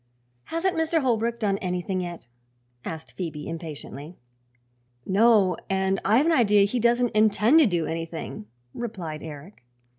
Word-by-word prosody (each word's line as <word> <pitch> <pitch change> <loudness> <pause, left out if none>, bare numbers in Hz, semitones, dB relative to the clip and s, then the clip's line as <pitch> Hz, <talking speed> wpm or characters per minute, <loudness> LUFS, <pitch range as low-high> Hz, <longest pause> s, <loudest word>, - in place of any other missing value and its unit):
"Hasn't 350 +3 -1
Mr. 320 0 +1
Holbrook 235 -2 0
done 200 -3 0
anything 185 +1 -2
yet?" 175 -6 -7 0.6
asked 160 -1 -7
Phoebe 160 -5 -6
impatiently. 160 -1 -8 0.9
"No; 200 -2 +4
and 190 0 0
I've 230 +9 +4
an 335 - +3
idea 210 -8 +4
he 240 +5 -1
doesn't 240 +1 +2
intend 215 +6 +4
to 305 - +6
do 175 -5 0
anything," 165 -9 -5 0.3
replied 180 -10 -5
Eric. 155 +2 -10
195 Hz, 130 wpm, -25 LUFS, 165-235 Hz, 0.9 s, to